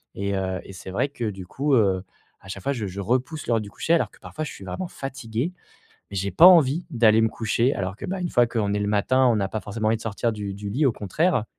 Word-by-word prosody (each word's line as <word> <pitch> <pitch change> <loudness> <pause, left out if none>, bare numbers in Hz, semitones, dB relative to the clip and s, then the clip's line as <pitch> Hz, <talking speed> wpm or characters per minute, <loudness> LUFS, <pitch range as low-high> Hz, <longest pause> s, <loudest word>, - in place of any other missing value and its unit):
et 100 0 -2
heu 95 -1 -2
et - - -11
c'est 95 +1 -9
vrai 130 +8 0
que 120 -4 -5
du 95 -2 -7
coup, 140 +5 -1
heu, 95 -4 +2 0.4
à 95 - -16
chaque 100 -1 -7
fois 140 - 0
je 110 -6 -3
je 95 +2 -5
repousse 130 - -1
l'heure 115 -2 +2
du 100 - -8
coucher 165 - 0
alors 170 - +2
que - - -20
parfois 155 - -6
je - - -6
suis 100 - -11
vraiment 175 - -4
fatigué 130 0 -4 0.6
mais - - -6
j'ai 100 +2 -1
pas 170 - +7
envie 165 -2 +5
d'aller 110 -2 +5
me 110 - +3
coucher 115 +4 +1
alors 95 +1 -3
que, - - -6
bah, 190 0 -3
une 175 - -2
fois 120 -1 +4
qu'on 105 -4 -1
est 105 - 0
le 105 - -1
matin, 130 +6 +3
on 115 - +4
n'a 100 -1 0
pas 110 - -3
forcément 110 +1 -3
envie 115 - +2
de - - -14
sortir 115 +2 -1
du 100 -2 -5
du 100 0 -6
lit 140 +8 +1
au 130 - +4
contraire. 125 - 0
110 Hz, 275 wpm, -24 LUFS, 100-135 Hz, 0.6 s, pas